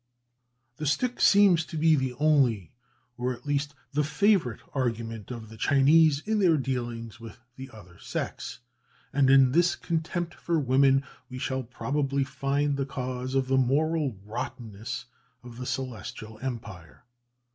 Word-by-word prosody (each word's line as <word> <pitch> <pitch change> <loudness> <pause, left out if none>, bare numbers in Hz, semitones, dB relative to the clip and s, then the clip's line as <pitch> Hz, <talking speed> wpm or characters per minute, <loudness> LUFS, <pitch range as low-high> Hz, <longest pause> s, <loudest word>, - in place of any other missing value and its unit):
_" - - -44
The 150 - -3
stick 245 - 0
seems 195 -5 +6
to 160 - -7
be 160 +1 +4
the 130 -3 -1
only, 130 - +2 0.5
or 125 +1 0
at 120 - -13
least 145 0 -1 0.2
the 150 +1 +2
favourite, 175 - +2
argument 115 -4 -3
of 115 -3 -7
the 110 - -12
Chinese 145 +4 +4
in 220 0 +1
their 175 -5 +4
dealings 120 -3 -4
with 115 -2 -10 0.2
the 130 +1 -9
other 95 -7 -15
sex; - - -5 0.5
and 135 -1 +3
in 135 -1 +6
this 175 +4 +3
contempt 170 +1 -3
for 170 -2 -1
women 135 0 +3 0.3
we 130 - -7
shall 130 0 -2
probably 140 +3 -1
find 140 +2 -1
the 135 - -1
cause 130 0 -4
of 135 -1 +1
the 135 0 +2
moral 145 -1 +1
rottenness 120 +1 -6 0.4
of 120 -1 -11
the 125 - -5
Celestial 110 -3 -5
Empire. 105 -10 -7
135 Hz, 150 wpm, -27 LUFS, 120-150 Hz, 0.5 s, seems